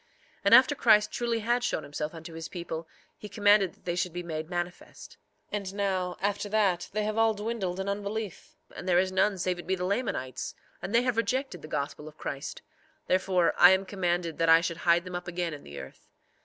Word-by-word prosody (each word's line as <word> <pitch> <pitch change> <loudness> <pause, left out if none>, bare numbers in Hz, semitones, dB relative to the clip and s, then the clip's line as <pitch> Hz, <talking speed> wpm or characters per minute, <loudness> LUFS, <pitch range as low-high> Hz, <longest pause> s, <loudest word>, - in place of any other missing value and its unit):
4:2 - - -37 0.4
And 200 - +8
after 260 +3 +7
Christ 215 -6 +4
truly 235 -1 -1
had 240 +3 +1
showed 155 - -1
himself 150 +3 -5
unto 165 0 -9
his 160 0 -7
people 170 -2 -5 0.3
he 210 - -8
commanded 205 -4 +4
that - - -31
they 175 - -1
should 180 -1 -1
be 175 0 -4
made 160 -1 -5
manifest. 175 0 -6 0.4
4:3 - - +2
And 195 -1 -6
now, 190 -3 -1
after 205 +1 -1
that, 195 -5 +1
they 215 +1 -1
have 215 +1 -1
all 225 -1 +4
dwindled 205 -4 -3
in 190 - -3
unbelief; 200 0 -4 0.2
and 185 - -5
there 175 - +4
is 185 +1 +2
none 190 +1 +2
save 180 0 -1
it 175 - -9
be 190 - +1
the 180 -1 -3
Lamanites, 185 - -2 0.3
and 205 - -3
they 235 - +5
have 250 -3 0
rejected 260 +4 -1
the - - -9
gospel 150 0 -4
of 155 - -12
Christ; 140 0 -6 0.4
therefore 185 -1 +2
I 175 - +10
am 190 +1 +1
commanded 175 -4 -1
that 165 0 +3
I 165 0 +8
should 170 -1 -3
hide 170 +1 +3
them 180 - -7
up 175 +1 -5
again 175 -1 -2
in 145 - -8
the 70 0 -9
earth. 65 0 -12
185 Hz, 225 wpm, -28 LUFS, 170-210 Hz, 0.4 s, I